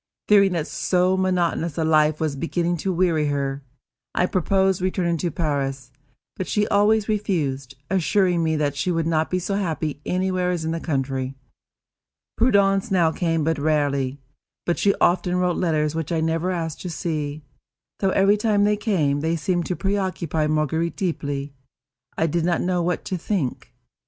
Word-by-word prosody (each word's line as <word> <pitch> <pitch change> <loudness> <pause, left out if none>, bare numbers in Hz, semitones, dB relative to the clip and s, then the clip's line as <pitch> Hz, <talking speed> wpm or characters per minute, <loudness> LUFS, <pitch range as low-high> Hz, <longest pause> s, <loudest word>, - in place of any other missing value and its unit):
Fearing 200 -2 +5
that 165 -3 -1
so 180 +1 +1
monotonous 175 -4 0
a 165 - +1
life 155 -1 +3
was 155 -3 -1
beginning 170 +3 -1
to 190 +4 -2
weary 170 -4 +1
her, 140 -1 -2 0.5
I 180 - +3
proposed 190 +1 +1
returning 180 -2 0
to 175 +2 -1
Paris; 135 -5 -2 0.5
but 185 - -3
she 210 0 +1
always 210 +1 +3
refused, 150 - -1
assuring 185 -1 +2
me 160 -1 +1
that 145 -2 0
she 165 - -1
could 165 -2 0
not 160 -1 +1
be 185 - 0
so 185 +2 -2
happy 160 -7 -2
anywhere 185 0 0
as 175 -3 -2
in 160 - -1
the 165 - -2
country. 135 -4 -2 1.0
Prudence 200 -3 +3
now 175 -5 +3
came 165 -1 0
but 160 0 0
rarely; 145 -3 0 0.5
but 175 - 0
she 200 - +3
often 180 0 +2
wrote 180 -1 +1
letters 155 -3 +1
which 160 -1 -3
I 165 - +1
never 165 +2 0
asked 165 -3 -3
to 180 - -5
see, 155 -2 -3 0.6
though, 195 - +2
every 195 +2 +4
time 210 -1 +2
they 210 0 +2
came, 165 -10 +1
they 160 +3 0
seemed 175 +1 -1
to 180 - -1
preoccupy 185 -6 -1
Marguerite 155 +2 0
deeply. 145 -6 -3 0.6
I 160 - +2
did 165 +1 0
not 175 0 +1
know 180 -1 0
what 175 0 -1
to 185 - -3
think. 165 - -3
170 Hz, 170 wpm, -23 LUFS, 155-185 Hz, 1.0 s, Fearing